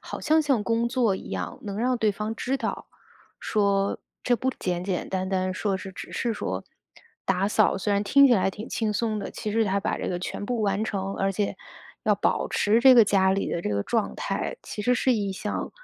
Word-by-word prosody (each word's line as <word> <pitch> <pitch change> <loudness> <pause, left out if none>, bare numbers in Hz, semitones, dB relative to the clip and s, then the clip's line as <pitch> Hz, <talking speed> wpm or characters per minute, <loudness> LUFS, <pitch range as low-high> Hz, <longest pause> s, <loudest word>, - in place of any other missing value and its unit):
好 - - -6
像 315 +1 +3
像 270 -7 +2
工 230 0 +1
作 235 -5 +2
一 - - -8
样， 90 -2 -4
能 200 0 -5
让 250 +1 +1
对 220 -2 +2
方 210 +2 -4
知 260 +3 -1
道， - - -4 0.5
说 200 -2 +1 0.2
这 245 - +3
不 260 +2 0
简 175 -1 -2
简 185 -1 -2
单 190 0 -2
单 185 -1 -1
说 195 0 -1
是， 190 0 -8
只 - - -9
是 230 -2 -1
说 95 - -4 0.6
打 195 +1 +1
扫， 210 -2 +3
虽 205 +1 0
然 200 0 +2
听 280 +6 +6
起 245 - +5
来 190 -1 +2
挺 210 +4 -8
轻 220 -2 -1
松 215 0 -1
的， - - -5
其 210 - -4
实 225 0 +3
她 200 -1 +1
把 - - -1
这 - - -3
个 175 - -2
全 185 - -5
部 240 +1 -2
完 200 0 +1
成， 195 -2 -2
而 195 0 0
且 200 +1 -1 0.5
要 - - +3
保 - - 0
持 215 +3 +2
这 260 +1 +8
个 235 -3 +8
家 190 -2 +3
里 195 +1 0
的 170 - -2
这 - - -2
个 100 -1 -1
状 225 -3 -1
态， - - -3
其 210 - -5
实 250 +3 +3
是 255 - +2
一 205 -4 -1
项 205 +2 -4
205 Hz, 245 characters per minute, -26 LUFS, 195-230 Hz, 0.6 s, 这